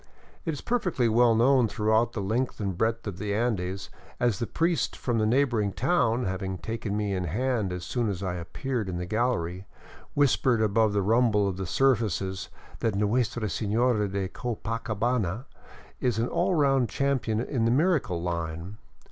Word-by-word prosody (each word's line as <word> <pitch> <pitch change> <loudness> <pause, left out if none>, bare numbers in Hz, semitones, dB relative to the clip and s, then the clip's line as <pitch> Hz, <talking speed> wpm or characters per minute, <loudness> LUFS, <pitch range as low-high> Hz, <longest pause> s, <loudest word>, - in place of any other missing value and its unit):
It 165 - 0
is 145 - -6
perfectly 180 - 0
well 115 +1 +4
known 125 +1 +4
throughout 110 +2 +1
the 100 - -3
length 120 +6 -1
and 100 -3 -2
breadth 115 +4 0
of 100 -3 -5
the 105 -1 -2
Andes, 100 -4 -2 0.3
as 120 -6 +1
the 120 - -2
priest 165 -4 0
from 120 -3 -1
the 110 - +2
neighboring 115 -5 +2
town, 130 -5 +1
having 95 0 -3
taken 110 0 -4
me 105 -2 -1
in 90 -1 -1
hand 110 +2 -1
as 90 0 -5
soon 120 -3 -1
as 100 -1 -4
I 95 -2 -1
appeared 100 +6 -3
in 90 - -3
the 90 - -3
gallery, 95 -4 -1 0.5
whispered 130 -4 +3
above 110 0 +2
the 100 -1 +1
rumble 110 -1 +3
of 95 -2 -3
the 95 -2 -4
serv 135 +5 +3
ices, 95 -2 -3 0.3
that 110 -3 0
Nuestra 110 +3 0
Sefiora 110 0 +1
de 95 -1 -1
Copacabana 115 0 -2 0.5
is 125 -4 0
an 115 +2 0
all 185 - +1
round 135 -5 +3
champion 130 -6 0
in 120 -1 -1
the - - +3
miracle 135 - +1
line. 85 +3 -4
110 Hz, 175 wpm, -27 LUFS, 100-125 Hz, 0.5 s, well